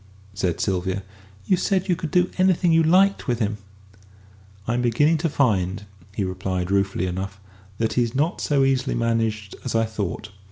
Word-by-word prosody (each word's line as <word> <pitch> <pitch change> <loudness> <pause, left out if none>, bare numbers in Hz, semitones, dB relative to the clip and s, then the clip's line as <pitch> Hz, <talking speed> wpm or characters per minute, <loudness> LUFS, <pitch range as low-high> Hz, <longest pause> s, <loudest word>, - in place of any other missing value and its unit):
said 90 -3 -1
Sylvia; 95 0 -1 0.4
"you 185 - +3
said 190 +1 0
you 180 - +2
could 160 -1 -5
do 180 +1 +2
anything 185 -2 +3
you 165 0 +5
liked 185 +4 +3
with 120 -2 +1
him." 105 -2 -2 1.1
"I'm 120 +1 0
beginning 145 +7 +3
to 165 +1 0
find," 100 -9 +1 0.3
he 105 - -1
replied, 95 0 -3
ruefully 100 -2 +1
enough, 95 +2 -4 0.4
"that 115 -1 0
he's 120 -1 0
not 155 +6 0
so 140 -2 +2
easily 135 -1 +1
managed 115 -3 -1
as 125 - -3
I 115 0 +3
thought. 110 -1 -4
115 Hz, 165 wpm, -23 LUFS, 100-155 Hz, 1.1 s, you